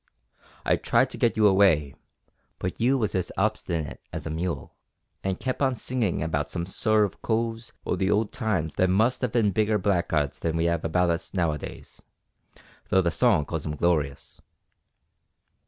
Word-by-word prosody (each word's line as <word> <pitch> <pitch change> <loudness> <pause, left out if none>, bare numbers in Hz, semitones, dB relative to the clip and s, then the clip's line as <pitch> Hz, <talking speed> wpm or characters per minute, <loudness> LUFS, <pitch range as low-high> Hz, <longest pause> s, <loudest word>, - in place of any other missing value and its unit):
I - - +3
tried - - +2
to - - -6
get 115 - +2
you 110 - +4
away, 95 -8 +4 0.6
but 90 - -4
you 130 +4 +3
was 110 -5 0
as 90 -2 -1
obstinate 95 -7 -1
as - - -6
a 80 - -3
mule, 80 -2 -3 0.5
an' 95 -1 0
kep' 130 +6 -4
on 130 -2 +2
singing 115 -10 -1
about 75 -2 -1
some 85 +1 -3
sort 110 +3 +2
o' - - -26
coves 115 0 -2
o' - - 0
the 95 +1 0
old 105 0 +1
times 110 - -1
that 95 - +3
must 110 +7 +2
have 125 -4 -1
bin 110 -4 +3
bigger 105 +2 +2
blackguards 85 -7 0
than 80 0 -1
we 85 +1 +2
'ave 85 -1 0
about 90 +1 +2
us 85 +4 -4
now 85 -4 +2
a 75 - -4
days, - - -10 0.9
though 95 - +4
the 85 - +1
song 105 -8 +3
calls 80 0 -4
'em 75 -1 -3
glorious." 75 -4 -1
95 Hz, 180 wpm, -26 LUFS, 80-110 Hz, 0.9 s, you